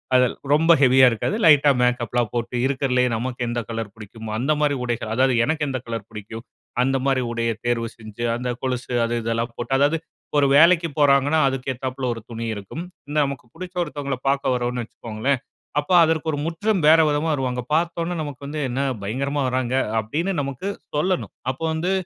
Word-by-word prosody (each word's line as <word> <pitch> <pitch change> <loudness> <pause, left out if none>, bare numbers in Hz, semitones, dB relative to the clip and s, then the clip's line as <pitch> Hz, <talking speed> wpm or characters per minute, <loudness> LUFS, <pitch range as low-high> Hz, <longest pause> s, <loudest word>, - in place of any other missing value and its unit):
அதெ 125 0 +5 0.3
ரொம்ப 165 +3 +4
ஹெவியா 130 0 +7
இருக்காது 115 - -1
லைட்டா 145 -2 +7
மேக்கப்லா 125 -1 +1
போட்டு, 120 +1 -3
இருக்குறதிலயே 130 -2 +1
நமக்கு 125 +2 -4
எந்த 120 0 -1
கலர் 115 -3 -4
புடிக்கும். 110 +1 -9
அந்த 135 +6 0
மாதிரி 145 -1 +2
உடைகள். 120 -2 -3
அதாவது 130 +1 +3
எனக்கு 155 +2 0
எந்த 130 -2 -2
கலர் 115 -2 -5
பிடிக்கும். 110 +1 -8 0.4
அந்த 135 +1 +2
மாதிரி 135 -2 +2
உடைய 115 0 0
தேர்வு 115 -1 0
செய்ஞ்சு, 110 +1 -8
அந்த 125 +1 -3
கொலுசு 125 -1 -3
அது 120 - -2
இதெல்லா 115 0 0
போட்டு 120 +2 -2
அதாவது 145 +4 +3 0.4
ஒரு 140 - +4
வேலைக்கி 170 +2 +6
போறாங்கன்னா 145 +2 +4
அதுக்கு 130 0 -3
ஏத்தாப்புல 130 +1 -4
ஒரு 115 - -8
துணி 115 0 -4
இருக்கும். 100 - -7 0.3
இந்த 150 - -2
நமக்கு 135 -3 -5
புடிச்ச 185 +1 -8
ஒருத்தவங்கள 140 -4 -4
பார்க்க 135 -2 +1
வரறோம்ன்னு 120 0 -2
வச்சுக்கோங்களேன் 115 +5 -2 0.4
அப்ப 145 - -8
அதற்கு 160 0 +1
ஒரு 145 - -2
முற்றும் 180 +2 0
வேற 160 +1 +7
விதமா 150 +2 0
வருவாங்க. 125 -3 -1
பார்த்த 170 +1 +1
உடனே 175 +1 -3
நமக்கு 140 -1 -7
வந்து, 150 +1 -4
"என்ன 130 +3 -1 0.2
பயங்கரமா 140 +7 -2
வறாங்க!" 130 0 -1 0.2
அப்படீன்னு 160 - -2
நமக்கு 140 +7 -5 0.3
சொல்லணும். 180 +4 0 0.2
அப்போ 135 +5 -9
வந்து 175 +4 -1
130 Hz, 175 wpm, -23 LUFS, 120-150 Hz, 0.4 s, ஹெவியா